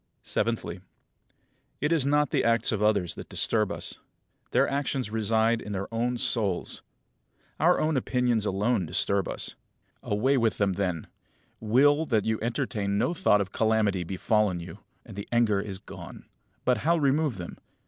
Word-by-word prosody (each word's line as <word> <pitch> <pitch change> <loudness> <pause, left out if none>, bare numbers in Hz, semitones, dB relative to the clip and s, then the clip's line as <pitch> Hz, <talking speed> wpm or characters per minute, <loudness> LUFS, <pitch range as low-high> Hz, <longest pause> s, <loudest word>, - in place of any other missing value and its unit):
Seventhly: 105 -5 -2 1.0
It 150 +3 0
is 155 -5 +2
not 150 -1 +2
the - - +1
acts 115 0 +3
of 110 -2 -1
others 105 -5 +2
that - - -10
disturb 105 -3 +1
us. - - -4 0.5
Their - - +3
actions 140 -4 -2
reside 110 +1 +2
in 105 - -6
their 100 +3 -5
own 120 +2 0
souls. 105 -7 0 0.8
Our 175 +4 +4
own 155 0 +1
opinions 125 -4 +1
alone 100 -1 0
disturb 100 +4 0
us. - - -5 0.5
Away 130 +7 +1
with 115 -3 +1
them 100 -2 +1
then; 90 -4 -2 0.5
will 145 +8 +3
that 110 -4 +1
you 110 -1 0
entertain 105 -3 -1
no 140 +11 +1
thought 160 - +3
of 95 - -4
calamity 110 -4 +1
befallen 95 +1 0
you, 85 - -9 0.3
and - - -11
the 100 - -7
anger 115 -4 +3
is 100 -1 -5
gone. - - -11 0.4
But 125 -3 +2
how 170 +8 +2
remove 145 -4 +1
them? 90 -2 -8
110 Hz, 160 wpm, -27 LUFS, 100-125 Hz, 1.0 s, Our